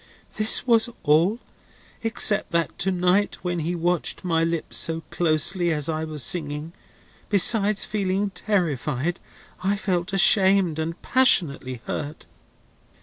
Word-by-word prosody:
"This 215 Hz, +3 st, +3 dB
was 230 Hz, -2 st, +3 dB
all; 165 Hz, +8 st, +2 dB, 0.6 s
except 225 Hz, -2 st, +1 dB
that 170 Hz, -1 st, -1 dB
to 190 Hz, -, 0 dB
night 180 Hz, +3 st, +1 dB
when 175 Hz, -1 st, -2 dB
he 165 Hz, +3 st, -2 dB
watched 175 Hz, +2 st, -1 dB
my 165 Hz, -3 st, 0 dB
lips 165 Hz, -1 st, -3 dB
so 165 Hz, 0 st, -1 dB
closely 170 Hz, +2 st, +1 dB
as 150 Hz, -2 st, -2 dB
I 160 Hz, -1 st, -3 dB
was 155 Hz, -4 st, -2 dB
singing, 155 Hz, -1 st, -2 dB, 0.6 s
besides 205 Hz, 0 st, +3 dB
feeling 195 Hz, -1 st, -2 dB
terrified 170 Hz, -, -2 dB, 0.4 s
I 195 Hz, +2 st, +1 dB
felt 185 Hz, -3 st, -2 dB
ashamed 190 Hz, -3 st, +3 dB
and 165 Hz, +2 st, -4 dB
passionately 140 Hz, -, +2 dB
hurt. 150 Hz, +1 st, -6 dB
175 Hz, 125 wpm, -23 LUFS, 160-195 Hz, 0.6 s, This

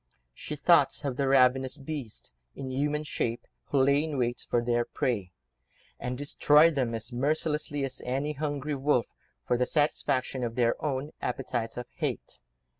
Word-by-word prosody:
She -, -, -6 dB
thought -, -, +3 dB
of 135 Hz, -3 st, -1 dB
the 140 Hz, +1 st, 0 dB
ravenous 130 Hz, 0 st, +4 dB
beasts—in 135 Hz, -1 st, -7 dB
human 150 Hz, +3 st, 0 dB
shape—who 120 Hz, 0 st, -4 dB
lay 140 Hz, +2 st, +4 dB
in 155 Hz, -3 st, -3 dB
wait 120 Hz, -2 st, -1 dB
for 120 Hz, -, +3 dB
their 120 Hz, 0 st, +1 dB
prey, 105 Hz, -7 st, -2 dB, 0.7 s
and 125 Hz, 0 st, -3 dB
destroyed 150 Hz, +3 st, +5 dB
them, 125 Hz, -5 st, 0 dB
as 115 Hz, +2 st, -5 dB
mercilessly 150 Hz, +2 st, -1 dB
as 135 Hz, -1 st, -3 dB
any 135 Hz, +4 st, -1 dB
hungry 145 Hz, 0 st, -3 dB
wolf, 135 Hz, -4 st, +2 dB, 0.4 s
for 125 Hz, -, 0 dB
the 125 Hz, 0 st, +1 dB
satisfaction 135 Hz, -4 st, 0 dB
of 115 Hz, -1 st, -3 dB
their 120 Hz, -2 st, +3 dB
own 145 Hz, 0 st, -2 dB
appetite 120 Hz, -3 st, -3 dB
of 125 Hz, -, -4 dB
hate. -, -, -4 dB
135 Hz, 150 wpm, -29 LUFS, 125-145 Hz, 0.7 s, destroyed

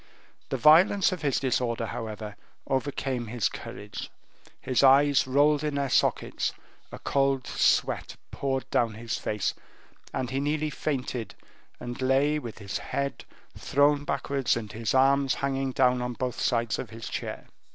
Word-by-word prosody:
The 135 Hz, -, -1 dB
violence 170 Hz, -, +6 dB
of 185 Hz, -, -4 dB
his 140 Hz, -4 st, +1 dB
disorder, 125 Hz, -3 st, 0 dB
however, 110 Hz, -2 st, -6 dB, 0.3 s
overcame 135 Hz, -3 st, -2 dB
his 115 Hz, -1 st, 0 dB
courage; 105 Hz, -1 st, -8 dB, 0.5 s
his 130 Hz, -, +1 dB
eyes 140 Hz, 0 st, +5 dB
rolled 145 Hz, +2 st, +3 dB
in 150 Hz, -1 st, -1 dB
their 140 Hz, -2 st, -1 dB
sockets, -, -, +1 dB, 0.4 s
a -, -, -7 dB
cold 135 Hz, -1 st, +1 dB
sweat -, -, +1 dB, 0.2 s
poured 135 Hz, -1 st, -2 dB
down 115 Hz, -2 st, +1 dB
his 115 Hz, 0 st, -4 dB
face, 105 Hz, -2 st, -1 dB, 0.6 s
and 130 Hz, -1 st, -3 dB
he 135 Hz, -, -1 dB
nearly 150 Hz, +2 st, -1 dB
fainted, 130 Hz, -6 st, -3 dB, 0.4 s
and 120 Hz, +1 st, -6 dB
lay 135 Hz, +3 st, +2 dB
with 120 Hz, -6 st, -8 dB
his 100 Hz, -2 st, -4 dB
head 140 Hz, 0 st, -3 dB, 0.3 s
thrown 145 Hz, +1 st, +2 dB
backwards 140 Hz, -2 st, 0 dB
and 110 Hz, -3 st, -6 dB
his 115 Hz, +3 st, -2 dB
arms 135 Hz, +1 st, +4 dB
hanging 135 Hz, -1 st, -1 dB
down 125 Hz, -1 st, +3 dB
on 125 Hz, 0 st, -3 dB
both 125 Hz, +1 st, -3 dB
sides 115 Hz, -2 st, +1 dB
of -, -, -5 dB
his 115 Hz, 0 st, -8 dB
chair. -, -, -5 dB
130 Hz, 150 wpm, -27 LUFS, 120-140 Hz, 0.6 s, violence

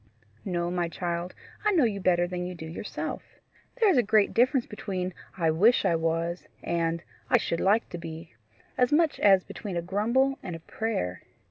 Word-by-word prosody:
"No, 175 Hz, -2 st, -1 dB
my 175 Hz, -1 st, 0 dB
child; 175 Hz, +1 st, -3 dB, 0.3 s
I 425 Hz, -1 st, +3 dB
know 330 Hz, -6 st, +4 dB
you 210 Hz, -4 st, +1 dB
better 175 Hz, -2 st, +3 dB
than 180 Hz, 0 st, -4 dB
you 180 Hz, 0 st, -5 dB
do 160 Hz, -, -8 dB
yourself. 160 Hz, +6 st, -5 dB, 0.5 s
There 460 Hz, -3 st, +3 dB
is 300 Hz, -, +2 dB
a -, -, +6 dB
great 210 Hz, -2 st, +3 dB
difference 255 Hz, +1 st, +3 dB
between 185 Hz, -3 st, -4 dB, 0.2 s
I 165 Hz, -3 st, +2 dB
WISH 210 Hz, +10 st, +4 dB
I 170 Hz, -, +3 dB
WAS 165 Hz, +1 st, -1 dB, 0.2 s
and 170 Hz, 0 st, -1 dB, 0.3 s
I -, -, +6 dB
SHOULD 170 Hz, -, -2 dB
LIKE 210 Hz, +4 st, +2 dB
TO 175 Hz, -, -6 dB
BE 165 Hz, -2 st, -8 dB, 0.5 s
as 250 Hz, -1 st, +3 dB
much 315 Hz, +1 st, +3 dB
as 195 Hz, -2 st, +5 dB
between 195 Hz, -5 st, -6 dB
a -, -, 0 dB
grumble 235 Hz, +9 st, +1 dB
and 175 Hz, -3 st, -5 dB
a -, -, -7 dB
prayer. 95 Hz, -, -3 dB
180 Hz, 190 wpm, -27 LUFS, 170-225 Hz, 0.5 s, a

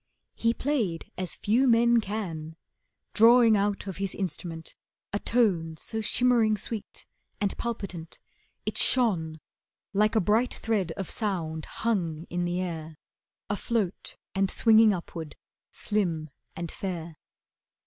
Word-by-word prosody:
He 230 Hz, 0 st, +1 dB
played 230 Hz, -, -1 dB
as 185 Hz, -1 st, -3 dB
few 240 Hz, +6 st, +2 dB
men 235 Hz, 0 st, +5 dB
can, 170 Hz, -7 st, -5 dB, 0.6 s
Drawing 230 Hz, 0 st, +7 dB
out 200 Hz, 0 st, 0 dB
of 195 Hz, -3 st, -5 dB
his 195 Hz, -1 st, -2 dB
instrument 170 Hz, -4 st, -5 dB, 0.4 s
a 205 Hz, -, 0 dB
tone 175 Hz, -11 st, +1 dB
So 220 Hz, +7 st, -4 dB
shimmering 230 Hz, -1 st, +3 dB
sweet 215 Hz, +1 st, -7 dB, 0.3 s
and 200 Hz, -1 st, 0 dB
palpitant, 195 Hz, -8 st, -5 dB, 0.5 s
it -, -, -1 dB
shone 170 Hz, -11 st, +2 dB, 0.5 s
Like 210 Hz, +2 st, +3 dB
a -, -, +5 dB
bright 220 Hz, +6 st, +2 dB
thread 205 Hz, -7 st, -1 dB
of 195 Hz, 0 st, -5 dB
sound 165 Hz, -7 st, -2 dB
hung 170 Hz, -8 st, -2 dB
in 175 Hz, 0 st, -1 dB
the 175 Hz, +1 st, -1 dB
air, 160 Hz, -4 st, -5 dB, 0.5 s
Afloat 205 Hz, -1 st, -1 dB, 0.2 s
and 195 Hz, 0 st, +1 dB
swinging 220 Hz, 0 st, +6 dB
upward, 170 Hz, -4 st, -5 dB, 0.3 s
slim 170 Hz, -8 st, -1 dB, 0.2 s
and 170 Hz, -1 st, -5 dB
fair. 170 Hz, -4 st, -5 dB
195 Hz, 125 wpm, -28 LUFS, 170-225 Hz, 0.6 s, Drawing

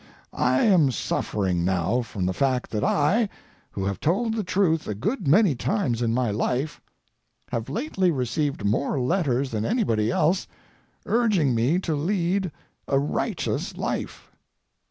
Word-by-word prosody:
I 130 Hz, +1 st, +2 dB
am 180 Hz, -10 st, +5 dB
suffering 95 Hz, -6 st, -1 dB
now 95 Hz, +6 st, +1 dB
from 105 Hz, -5 st, -4 dB
the 95 Hz, -, 0 dB
fact 130 Hz, +4 st, 0 dB
that 105 Hz, -1 st, -1 dB
I, 200 Hz, +9 st, +2 dB, 0.4 s
who 95 Hz, -, -4 dB
have 100 Hz, -2 st, -2 dB
told 220 Hz, +8 st, +1 dB
the 220 Hz, -1 st, -1 dB
truth 175 Hz, -4 st, +1 dB
a 105 Hz, -, -2 dB
good 195 Hz, -, -2 dB
many 180 Hz, +3 st, +5 dB
times 130 Hz, -, -1 dB
in 115 Hz, -1 st, +1 dB
my 120 Hz, -2 st, +1 dB
life, 125 Hz, +8 st, -2 dB, 0.7 s
have 115 Hz, -1 st, -3 dB
lately 210 Hz, -, 0 dB
received 135 Hz, -3 st, -1 dB
more 125 Hz, +7 st, 0 dB
letters 135 Hz, -2 st, 0 dB
than 110 Hz, -2 st, -2 dB
anybody 115 Hz, -, +1 dB
else 165 Hz, +9 st, +1 dB, 0.6 s
urging 210 Hz, -, +2 dB
me 120 Hz, +9 st, +2 dB
to 165 Hz, -, -1 dB
lead 180 Hz, +3 st, 0 dB, 0.4 s
a 135 Hz, -, +2 dB
righteous 140 Hz, +2 st, -2 dB
life. -, -, -4 dB
140 Hz, 145 wpm, -25 LUFS, 115-185 Hz, 0.7 s, am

